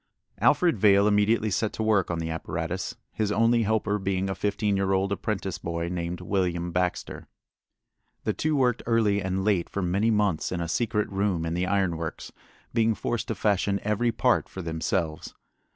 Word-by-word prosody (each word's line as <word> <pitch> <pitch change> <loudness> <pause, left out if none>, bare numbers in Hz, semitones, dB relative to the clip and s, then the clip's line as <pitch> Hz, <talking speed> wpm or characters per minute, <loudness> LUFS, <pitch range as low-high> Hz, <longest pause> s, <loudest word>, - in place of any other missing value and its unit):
Alfred 155 - +3
Vail 100 0 +5
immediately 105 +1 +2
set 105 +3 0
to 110 - -3
work 105 -4 +2
on 85 - -1
the 80 0 -3
apparatus, 80 +3 -4 0.2
his 105 -2 -1
only 115 +2 +3
helper 105 -1 0
being 95 0 -1
a - - 0
fifteen 105 +1 0
year 95 0 +1
old 95 +1 +1
apprentice 100 -2 -2
boy 85 0 -3
named 85 0 -3
William 90 -2 -1
Baxter. 90 +1 -2 1.0
The - - 0
two 155 0 0
worked 125 -4 +2
early 110 -4 +2
and 95 +1 -2
late 100 -5 +1
for 100 - -3
many 100 +6 +1
months 105 -7 +1
in 90 - -2
a 85 - -2
secret 105 +4 0
room 95 -4 0
in 80 - -2
the 90 +2 -1
iron 95 -4 +1
works, 80 -1 -6 0.4
being 115 -1 +2
forced 115 +1 -2
to 110 - -2
fashion 100 0 +1
every 105 +3 +1
part - - +1
for 95 - -7
themselves. 80 -1 -2
100 Hz, 180 wpm, -26 LUFS, 90-105 Hz, 1.0 s, Vail